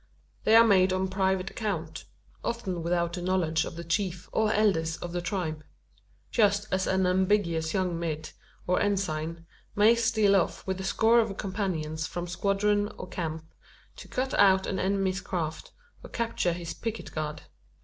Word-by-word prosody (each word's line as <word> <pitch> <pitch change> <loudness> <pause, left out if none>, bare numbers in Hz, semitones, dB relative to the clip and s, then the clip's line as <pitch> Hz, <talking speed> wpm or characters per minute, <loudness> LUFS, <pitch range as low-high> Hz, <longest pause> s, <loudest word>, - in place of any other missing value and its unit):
They 220 - +6
are 230 0 +9
made 190 -3 +4
on 185 0 0
private 190 -1 0
account 165 -8 -4 0.4
often 195 -7 -3
without 170 0 0
the 180 - -4
knowledge 175 -3 +1
of - - -7
the 170 - -6
chief, 180 0 -2
or 220 -1 +2
elders 165 -7 +2
of 175 - -6
the 175 0 -2
tribe 170 -4 -3 0.7
just 205 -1 +2
as 190 0 +1
an 190 0 +2
ambitious 180 -3 +1
young 180 -3 0
mid, 155 -2 -4 0.3
or 180 - +1
ensign, 165 -5 -1 0.3
may 210 +3 +6
steal 220 -3 +3
off 190 - 0
with 190 0 -2
a - - -5
score 225 +4 +4
of 220 -4 0
companions 165 -6 -2
from 175 0 -4
squadron 205 +3 +1
or - - -7
camp, 160 -2 -5 0.4
to - - -10
cut 260 +1 -2
out 190 -1 +5
an 190 - -2
enemy's 195 0 0
craft, 165 -4 -4 0.3
or - - -10
capture 230 -7 -1
his 170 -1 -5
picket 225 -1 -5
guard. 150 -1 -4
185 Hz, 165 wpm, -28 LUFS, 170-205 Hz, 0.7 s, are